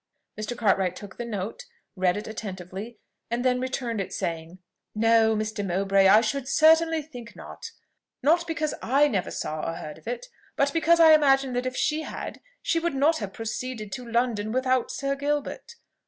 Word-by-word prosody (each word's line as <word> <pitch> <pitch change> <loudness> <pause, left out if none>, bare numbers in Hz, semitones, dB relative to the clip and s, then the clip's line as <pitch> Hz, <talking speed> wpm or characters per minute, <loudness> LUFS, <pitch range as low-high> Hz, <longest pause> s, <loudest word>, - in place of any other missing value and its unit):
Mr. 215 +3 -5
Cartwright 190 -5 +2
took 200 -1 -10
the 240 - -4
note, 220 - -5 0.3
read 185 0 +1
it 210 - -6
attentively, 200 +1 -7 0.3
and 240 +2 -2
then 250 0 +2
returned 245 -4 -2
it, 190 - -6
saying, 165 +1 -4 0.4
"No, 225 0 +4
Mr. 215 -1 -2
Mowbray, 195 +1 +3
I 210 +3 +7
should 255 +4 -2
certainly 320 +2 +4
think 245 -6 -11
not: - - -9 0.5
not 335 +4 +3
because 310 -2 -1
I 280 +4 +3
never 200 -9 -1
saw 155 0 -4
or 165 - -3
heard 155 -2 -8
of - - -19
it, - - -4 0.3
but 280 0 +1
because 335 +1 +4
I 320 -1 +8
imagine 270 -3 +4
that 250 +1 -1
if 255 - -4
she 310 +1 +1
had, - - -7 0.2
she 330 - +1
would 335 -3 -2
not 295 +4 +3
have 205 -3 -5
proceeded 225 0 -5
to 245 -1 -7
London 230 -3 0
without 255 0 +1
Sir 275 0 -2
Gilbert. 290 - -3
240 Hz, 180 wpm, -26 LUFS, 205-285 Hz, 0.5 s, I